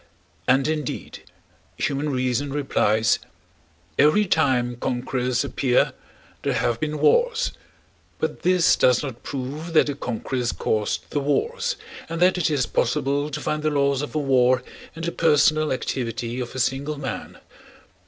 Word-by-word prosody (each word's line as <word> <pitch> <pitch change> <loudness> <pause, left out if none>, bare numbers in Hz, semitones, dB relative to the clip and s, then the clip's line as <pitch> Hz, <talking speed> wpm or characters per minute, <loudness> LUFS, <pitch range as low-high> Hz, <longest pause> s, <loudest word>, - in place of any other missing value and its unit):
And, 130 +2 +4
indeed, 155 -1 -4 0.6
human 145 +1 -1
reason 130 +1 -1
replies: 115 -6 +2 0.8
every 155 +9 +5
time 130 -8 +1
conquerors 125 0 -1
appear 125 -2 +1 0.5
there - - 0
have 120 -1 0
been 155 0 -2
wars, 485 - +3 0.7
but - - -3
this 180 -2 +4
does 125 +1 +3
not 130 -5 -6
prove 145 +5 -5
that 155 - +6
the 145 - -2
conquerors 125 -1 -3
caused 105 -1 -2
the 145 - 0
wars 465 - 0 0.3
and 165 0 -3
that 180 +1 +4
it 170 - +2
is 145 -4 +1
possible 140 +4 0
to 150 0 -4
find 150 +1 -2
the 155 - +1
laws 140 -2 +1
of 145 - -6
a - - +2
war 130 -3 +3 0.3
in 165 - -7
the 170 - -1
personal 155 -1 +3
activity 120 -2 -3
of 125 0 -5
a - - -3
single 135 +4 -1
man. 135 -2 -5
140 Hz, 145 wpm, -23 LUFS, 125-155 Hz, 0.8 s, that